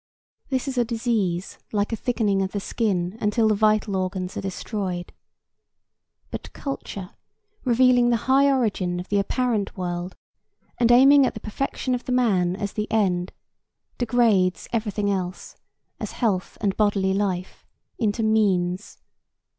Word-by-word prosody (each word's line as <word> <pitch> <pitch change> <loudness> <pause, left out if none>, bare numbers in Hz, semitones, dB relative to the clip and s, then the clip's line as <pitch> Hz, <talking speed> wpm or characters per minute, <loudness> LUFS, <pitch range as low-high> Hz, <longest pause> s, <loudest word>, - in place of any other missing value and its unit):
This 260 +1 -1
is 260 -2 -1
a - - +4
disease 225 -6 -1
like 205 +1 0
a - - +2
thickening 215 -4 0
of 190 0 -2
the 205 - -1
skin 195 -3 -1
until 220 +2 +2
the 215 - +4
vital 215 -1 +2
organs 185 0 -2
are - - -3
destroyed. 190 -2 -4 1.2
But - - -7
culture, 200 -9 -6 0.5
revealing 245 0 +4
the 235 -1 0
high 275 +2 +5
origin 200 -9 0
of 180 - -7
the 205 - +2
apparent 220 0 -1
world 175 0 -4 0.6
and 240 -1 +4
aiming 270 +2 +7
at - - -4
the - - -5
perfection 255 +3 -3
of 250 - -3
the - - -3
man 190 -8 +2
as 200 0 -4
the 210 0 -3
end, 185 -5 +1 0.7
degrades 220 -6 +2
every 220 -2 0
thing 205 0 0
else, 185 -1 -4 0.4
as - - -5
health 200 -7 -1
and 200 -2 0
bodily 200 -3 +2
life, 190 -2 -3 0.3
into 220 -1 0
means. 195 -4 +1
210 Hz, 145 wpm, -24 LUFS, 190-235 Hz, 1.2 s, aiming